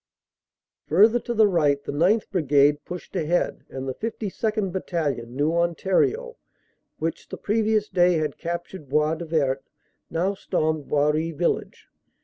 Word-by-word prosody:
Further 215 +9 +5
to 240 - -4
the 220 -1 +6
right, 145 -7 +2
the - - -4
9th. 180 +10 +2
Brigade 145 -4 +3
pushed 180 0 -8
ahead, 170 +3 0
and 135 0 -6
the 130 - -2
52nd. 215 - -2
Battalion, 145 -10 -3
New 150 +4 +1
Ontario, 190 - +1 0.6
which 165 +1 -4
the - - -6
previous 215 0 +1
day 180 -2 +3
had 155 -3 -2
captured 170 -2 -5
Bois 150 +2 +2
du 170 +1 -5
Vert, 140 -5 0 0.5
now 180 +4 0
stormed 155 -6 -1
Boiry 150 +2 +1
village. 165 +2 -2
165 Hz, 135 wpm, -24 LUFS, 150-195 Hz, 0.6 s, the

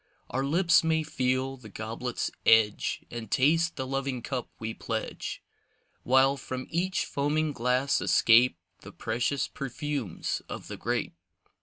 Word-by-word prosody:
Our 135 - 0
lips 165 +5 +4
may 160 -1 +2
feel 130 -2 -1
the 115 -4 -12
goblet's 115 +4 -4
edge 110 -2 +3
And 115 -3 -6
taste 160 +6 +3
the 130 - -3
loving 135 -2 -2
cup 130 -3 -3
we 110 0 -4
pledge. - - -4 0.6
While 130 +2 +4
from 130 -1 -5
each 180 +3 0
foaming 150 +2 0
glass 125 +3 +1
escape 115 -3 +5 0.2
The - - -12
precious 120 +4 -1
perfumes 140 - -3
of - - -7
the - - -6
grape. - - -2
130 Hz, 135 wpm, -28 LUFS, 120-145 Hz, 0.6 s, escape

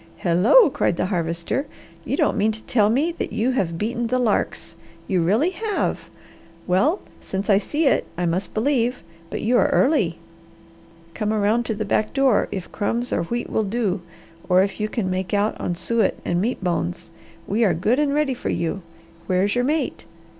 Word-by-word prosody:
"Hello!" 195 - +5
cried 170 - 0
the - - 0
Harvester. 170 - -2 0.4
"You - - -1
don't - - +2
mean 215 0 +2
to 220 - -8
tell 210 -4 +2
me 285 +9 +2
that 335 - -5
you 240 +4 0
have 175 -10 -1
beaten 235 +4 -2
the 255 +2 +1
larks! 230 -7 -1 0.3
You 185 -2 +1
really 220 - +2
have! 430 +1 -2 0.6
Well 265 - +2 0.2
since 195 +2 -2
I 195 - +5
see 300 +10 -1
it, 275 - +2
I 180 - 0
must 175 +3 -2
believe, 245 -1 0 0.3
but - - -4
you 240 +3 +3
are - - +4
early. 220 - +2 1.0
Come 215 +1 -2
around 220 +2 +1
to 220 - -1
the 215 +1 -3
back 215 +1 0
door 270 -5 +3
if 190 -3 -5
crumbs 235 +4 -2
or - - 0
wheat 235 +7 -3
will 220 - +1
do 205 -3 -1 0.5
or 185 +1 +5
if 195 +1 -4
you 215 0 -1
can 220 -5 -2
make 185 +1 -1
out 205 +2 +1
on 175 - -2
suet 220 +3 0
and 175 +1 0
meat 225 -1 -2
bones! 165 - -2 0.3
We 220 +4 +1
are 185 -7 +3
good 220 - +1
and 295 -1 +2
ready 290 -2 +1
for 245 - -4
you. 170 +4 -2 0.5
Where 185 0 +2
is 200 - +1
your 245 0 +1
mate? 305 +3 -1
215 Hz, 190 wpm, -22 LUFS, 185-245 Hz, 1.0 s, Hello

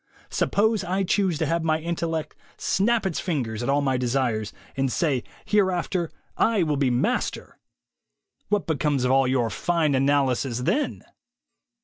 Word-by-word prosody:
Suppose 215 0 +1
I 185 +2 0
choose 190 -3 +1
to - - 0
have 165 0 0
my 155 -1 +2
intellect 165 -1 -3 0.2
snap 225 +2 +1
its 185 -4 -1
fingers 125 - -2
at 120 - -2
all 140 +1 +3
my 135 -2 +1
desires, 120 -4 0 0.2
and 135 -1 0
say 140 -6 0 0.2
'Hereafter 185 -4 +1 0.3
/ - - -26
will 180 -10 +2
be 135 -2 +2
master?' 120 0 -1 0.9
What 205 -6 +1
becomes 145 -3 0
of 125 - +2
all 135 0 +4
your 125 -4 +1
fine 165 +4 +1
analysis 135 -2 +1
then?" 290 - -1
150 Hz, 145 wpm, -25 LUFS, 130-180 Hz, 0.9 s, all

